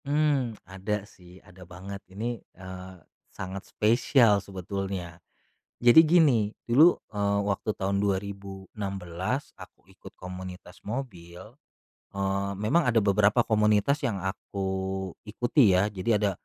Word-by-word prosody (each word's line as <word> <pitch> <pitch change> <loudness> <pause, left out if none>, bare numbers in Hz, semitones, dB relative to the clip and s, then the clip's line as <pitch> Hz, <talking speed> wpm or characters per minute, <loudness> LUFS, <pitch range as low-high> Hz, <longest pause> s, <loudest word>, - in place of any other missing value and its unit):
Mmm, 140 -6 +1
ada 100 +2 -4
sih. 90 -3 -17
Ada 90 0 -17
banget. 95 +2 -8
Ini, 115 +4 -4 0.2
eee, 95 0 -9 0.3
sangat 95 +1 -7
spesial 115 -1 +3
sebetulnya. 95 -2 -5 0.6
Jadi 120 +5 +9
gini, 155 -8 +5 0.2
dulu, 150 +9 +6 0.2
eee, 100 -1 0
waktu 100 +1 -1
tahun 100 +1 -1
2016, 100 +1 -3
aku - - -13
ikut - - -14
komunitas 90 -1 -9
mobil, 105 -2 -7 0.6
eee, 100 0 -1
memang 110 - +1
ada 115 -3 +3
beberapa 105 +3 +3
komunitas 105 +5 +2
yang 120 -8 -1
aku 95 0 -3 0.2
ikuti, 115 - +3
ya. 100 +3 +2
Jadi 95 +3 -4
ada 105 -1 +1
100 Hz, 115 wpm, -27 LUFS, 95-115 Hz, 0.6 s, Jadi